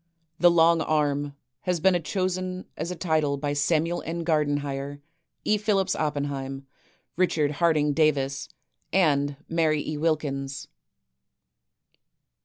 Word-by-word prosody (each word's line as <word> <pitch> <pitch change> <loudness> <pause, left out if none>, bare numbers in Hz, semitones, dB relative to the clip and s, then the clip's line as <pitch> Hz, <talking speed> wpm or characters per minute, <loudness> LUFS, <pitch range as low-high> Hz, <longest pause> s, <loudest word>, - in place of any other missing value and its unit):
" - - -44
The 175 - +7
Long 165 -1 +4
Arm 145 -2 0
" 125 - -57
has 180 -2 +1
been 180 +1 +3
chosen 185 +1 -2
as 160 +3 -4
a 180 - -3
title 155 -5 0
by 145 0 -2
Samuel 160 +4 +1
N. 170 +1 -4
Gardenhire, 145 -3 -1 0.5
E. 210 0 +2
Phillips 195 -3 +1
Oppenheim, 140 -2 -3 0.5
Richard 160 -5 +2
Harding 155 -3 +3
Davis, 140 -3 +1 0.4
and 145 -6 +2
Mary 160 -3 +1
E. 155 - -3
Wilkins. 140 -4 -2
155 Hz, 120 wpm, -26 LUFS, 145-170 Hz, 0.5 s, The